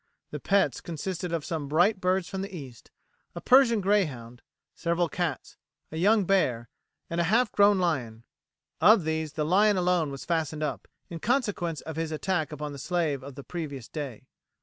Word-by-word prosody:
The - - -5
pets 200 0 +1
consisted 175 +2 -4
of 165 -3 -2
some 155 -4 -3
bright 180 +7 +2
birds 185 0 +1
from 190 - -4
the 195 - -5
East, 135 -10 -10 0.5
a - - -4
Persian 245 -4 +5
greyhound, 140 - 0 0.3
several 170 0 0
cats, 170 -4 -4 0.3
a 160 - -5
young 205 +4 +3
bear, 125 -12 +1 0.4
and 170 +1 -1
a - - +1
half 225 +6 +2
grown 205 0 +5
lion. 130 -11 -1 0.6
Of 215 -3 +6
these 160 -1 -2
the 150 - -1
lion 200 +5 +4
alone 180 -4 +1
was 135 -1 -7
fastened 155 -2 -1
up, 135 -9 -4 0.2
in 165 - -5
consequence 205 - -1
of 160 -1 -7
his 165 -1 -2
attack 160 0 -1
upon 150 0 -5
the 140 - -8
slave 155 -4 -1
on 140 -1 -9
the 140 - -9
previous 145 -8 -6
day. 135 -6 -6
165 Hz, 175 wpm, -27 LUFS, 145-190 Hz, 0.6 s, Of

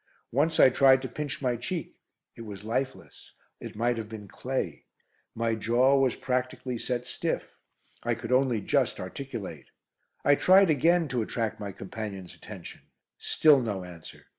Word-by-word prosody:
Once 155 +6 +1
I - - +9
tried 130 0 +5
to - - -2
pinch 140 +2 -5
my 125 -2 +1
cheek; 145 +8 -5 0.4
it - - -10
was 105 -3 -8
lifeless. 130 +4 -4 0.3
It - - -8
might 120 +2 0
have 110 -1 -6
been 110 -2 -8
clay. 130 +7 -4 0.5
My 115 0 0
jaw 120 +5 +3
was 130 -2 +2
practically 125 -1 -2
set 125 0 -2
stiff. - - -3 0.5
I 120 0 0
could 115 +2 -6
only 125 -4 +3
just - - +1
articulate. 95 - -6 0.6
I 145 - +6
tried 185 +4 +6
again 165 +3 +3
to 125 -2 0
attract 110 0 -2
my 100 -2 -5
companion's 95 -1 -7
attention. - - -10 0.4
Still 150 -4 +4
no 105 -6 -3
answer. 85 -3 -12
120 Hz, 155 wpm, -28 LUFS, 110-135 Hz, 0.6 s, I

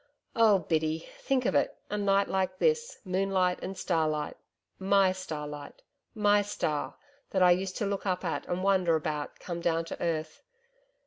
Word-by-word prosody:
Oh, 220 -3 +6
Biddy, 160 -2 -1
think 260 -2 0
of - - +2
it - - +1
a - - 0
night 200 -1 +2
like 185 -1 -1
this 470 - +1
moonlight 185 -1 +1
and 190 +1 -5
starlight 155 -4 0 0.4
MY 195 0 +4
starlight 150 -5 -7 0.3
MY 205 -1 +4
star, 155 -7 -2 0.3
that 190 -1 +2
I 180 - +7
used 185 +1 0
to 210 - -1
look 200 0 -2
up 185 0 -1
at 165 - -2
and 180 +1 -2
wonder 185 -4 +3
about, 150 -2 -3
come 170 -1 -5
down 165 -1 +1
to - - -7
earth. 155 -2 -2
185 Hz, 165 wpm, -29 LUFS, 165-195 Hz, 0.4 s, I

